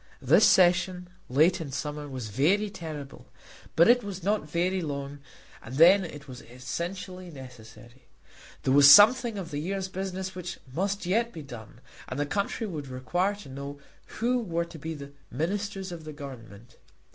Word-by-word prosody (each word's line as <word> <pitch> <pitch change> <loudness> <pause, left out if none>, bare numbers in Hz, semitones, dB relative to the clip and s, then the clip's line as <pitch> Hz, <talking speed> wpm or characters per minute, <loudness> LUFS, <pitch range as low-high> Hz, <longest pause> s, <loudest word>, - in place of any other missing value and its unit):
This - - +5
session, 180 0 +3 0.2
late 155 +7 +3
in 145 -4 -6
summer, 150 +1 -4
was 130 -5 -6
very 190 - +1
terrible; 150 -7 -8 0.5
but 170 - +6
it 245 +1 +5
was 195 -3 -7
not 200 -5 0
very 180 +3 0
long, 140 -2 -5 0.4
and 125 - -9
then 180 +6 +7
it 150 -4 -9
was 125 -2 -9
essentially 175 +9 -6
necessary. 125 -3 -13 0.6
There 130 - +2
was 140 0 +8
something 230 - +7
of 180 -4 -6
the 145 - -3
year's 190 +4 -3
business 190 0 -4
which 180 +1 -6 0.2
must 200 +4 -2
yet 230 +6 +1
be 160 - -9
done, 120 -3 -11 0.3
and 130 - -5
the 145 - +1
country 200 +7 -2
would 155 -8 -5
require 175 +10 -1
to 205 -8 -12
know 140 +2 -7 0.4
who 245 +2 +1
were 170 -7 -2
to 170 -1 -12
be 160 +2 -5
the 140 -1 -9 0.2
Ministers 195 - -3
of 170 -2 -8
the 155 0 -8
Government. 120 -5 -11
165 Hz, 170 wpm, -27 LUFS, 140-190 Hz, 0.6 s, was